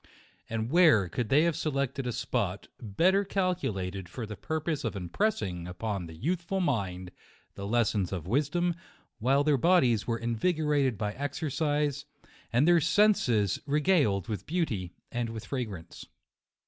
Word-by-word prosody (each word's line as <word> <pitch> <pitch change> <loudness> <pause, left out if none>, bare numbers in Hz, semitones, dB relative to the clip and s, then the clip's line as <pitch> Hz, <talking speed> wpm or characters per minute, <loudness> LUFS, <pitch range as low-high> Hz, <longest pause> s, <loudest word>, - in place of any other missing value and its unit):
And 115 +2 -2
where 155 - +5
could 110 +5 -3
they 145 +3 +5
have 170 -2 +1
selected 140 -4 -2
a - - 0
spot, - - -2
better 175 - +2
cal 190 -2 +1
culated 95 - -4
for 115 +5 -5
the 105 0 -7
purpose 155 - -3
of 115 -3 -2
impressing 90 - -2
upon 95 0 -4
the 80 - -10
youthful 175 - -2
mind 95 - -1 0.4
the 100 - -6
lessons 105 -4 +1
of 90 -5 -4
wisdom, 155 - +1 0.5
while 135 +5 +3
their 145 -1 +3
bodies 130 - +3
were 115 -1 0
invigorated 140 - +1
by 105 0 -2
exercise, 145 +1 -1 0.5
and 125 +7 +3
their 175 -1 +5
senses 145 - +3
regaled 145 - +2
with 105 -2 -5
beauty 120 - -2 0.2
and 120 -1 -2
with 115 -1 -7
fragrance. 105 - -6
125 Hz, 145 wpm, -29 LUFS, 105-160 Hz, 0.5 s, where